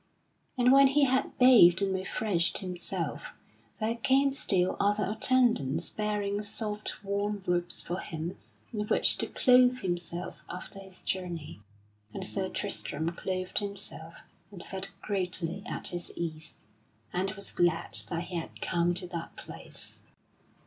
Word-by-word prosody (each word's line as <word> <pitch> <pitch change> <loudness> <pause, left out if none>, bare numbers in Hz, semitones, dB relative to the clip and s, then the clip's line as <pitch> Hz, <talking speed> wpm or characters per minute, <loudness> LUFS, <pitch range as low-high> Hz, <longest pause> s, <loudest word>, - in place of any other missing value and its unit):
And 250 0 +5
when 275 0 +8
he 285 +2 +3
had 260 -1 +1
bathed 225 -9 +8
and 195 -1 +1
refreshed 190 -2 0
himself, 180 -2 -4 0.5
there 225 +1 0
came 270 +3 +3
still 185 -8 +1
other 205 0 +2
attendants 220 - +3
bearing 210 -1 -1
soft 210 0 -3
warm 200 0 -2
robes 175 0 0
for 175 +2 -3
him 165 +1 -5 0.4
in 210 -1 -2
which - - +4
to - - 0
clothe 250 0 +4
himself 175 -1 -3
after 185 +2 -7
his 190 -1 -11
journey; 170 - -4 0.5
and - - -3
Sir - - -1
Tristram 160 +3 -2
clothed 185 +1 -2
himself 200 -5 -5 0.3
and 190 -4 -10
felt 195 0 -4
greatly 185 -2 -2
at - - -3
his 175 -1 -6
ease, 160 -2 -5 0.6
and 185 +2 0
was 200 -1 -5
glad 175 -2 +1
that 170 -1 -2
he 175 0 -5
had 165 - -6
come 175 +1 +1
to 180 +1 -2
that 170 -2 -6
place. - - -11
190 Hz, 140 wpm, -29 LUFS, 175-210 Hz, 0.6 s, when